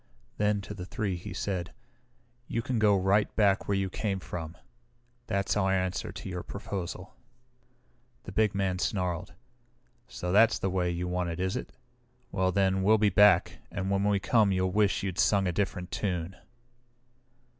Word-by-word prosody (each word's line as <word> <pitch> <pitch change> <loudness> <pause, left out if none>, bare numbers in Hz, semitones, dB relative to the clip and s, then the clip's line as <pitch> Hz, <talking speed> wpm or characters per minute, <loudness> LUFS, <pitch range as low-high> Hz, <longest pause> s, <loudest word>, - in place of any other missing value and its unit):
Then 105 -1 +2
to 100 - -7
the 90 -3 -7
three 100 -3 -2
he 85 - -8
said, 95 -3 -3 0.7
"You 115 - -2
can 125 -2 -1
go 105 -2 +4
right 95 +3 +2
back 100 -3 +3
where 100 - +1
you 95 0 0
came 95 +1 -2
from. 85 -2 -7 0.7
That's 100 0 0
our 95 -2 +2
answer 95 -1 -1
to - - -8
your 90 -2 -4
proposal." 95 -2 -6 1.1
The - - -8
big 105 0 +1
man 95 -2 0
snarled. 90 -3 -2 0.7
"So 90 -7 -4
that's 110 +3 +5
the 95 - -2
way 90 -1 0
you 85 +1 -2
want 90 -1 -1
it, 85 +1 -5
is 95 +3 -1
it? 125 - -5 0.6
Well 95 -1 +1
then, 95 0 +2
we'll 110 +3 +5
be 105 -1 +3
back, 105 -4 +4
and 95 0 -3
when 100 0 +1
we 100 0 +3
come 105 0 +3
you'll 95 0 +1
wish 100 -1 +2
you'd 95 -2 -3
sung 100 -2 +3
a 90 - +1
different 90 -1 -2
tune!" 90 -2 -2
95 Hz, 170 wpm, -29 LUFS, 90-100 Hz, 1.1 s, that's